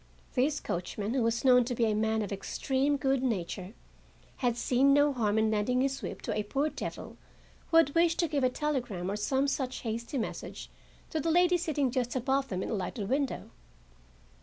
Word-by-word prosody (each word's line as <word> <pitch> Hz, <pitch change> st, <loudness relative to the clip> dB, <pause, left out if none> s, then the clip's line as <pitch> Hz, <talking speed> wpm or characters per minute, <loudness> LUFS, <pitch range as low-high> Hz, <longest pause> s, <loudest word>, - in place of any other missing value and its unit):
This 280 Hz, +4 st, +1 dB
coachman, 200 Hz, +5 st, -3 dB
who 260 Hz, -, +1 dB
was 230 Hz, +2 st, 0 dB
known 250 Hz, -1 st, +7 dB
to 245 Hz, 0 st, -2 dB
be 230 Hz, -, +2 dB
a 215 Hz, -, +1 dB
man 220 Hz, +1 st, +1 dB
of 205 Hz, -, -6 dB
extreme 270 Hz, +8 st, 0 dB
good 270 Hz, -2 st, +1 dB
nature, 195 Hz, -5 st, -2 dB, 0.6 s
had 240 Hz, -2 st, 0 dB
seen 265 Hz, +3 st, +3 dB
no 290 Hz, 0 st, +4 dB
harm 220 Hz, -4 st, +1 dB
in 220 Hz, 0 st, +3 dB
lending 220 Hz, +4 st, +1 dB
his 270 Hz, 0 st, -1 dB
whip -, -, -6 dB
to 225 Hz, -, -2 dB
a 215 Hz, -, +1 dB
poor 275 Hz, +8 st, -1 dB
devil -, -, -7 dB, 0.5 s
who 330 Hz, -1 st, +7 dB
wished 335 Hz, 0 st, +3 dB
to 335 Hz, -, +2 dB
give 290 Hz, -4 st, -1 dB
a 255 Hz, -, +4 dB
telegram 245 Hz, -, -2 dB
or -, -, -2 dB
some 265 Hz, +6 st, +1 dB
such 265 Hz, -2 st, -2 dB
hasty 235 Hz, +3 st, -3 dB
message 230 Hz, -, -5 dB, 0.4 s
to 320 Hz, -, -1 dB
the 330 Hz, -, -1 dB
lady 355 Hz, +2 st, +4 dB
sitting 300 Hz, -7 st, 0 dB
just 245 Hz, -1 st, -1 dB
above 270 Hz, +2 st, +1 dB
them 185 Hz, -4 st, -3 dB
in -, -, -4 dB
a -, -, -1 dB
lighted 200 Hz, +1 st, -3 dB
window. 275 Hz, 0 st, -1 dB
255 Hz, 195 wpm, -30 LUFS, 220-280 Hz, 0.6 s, known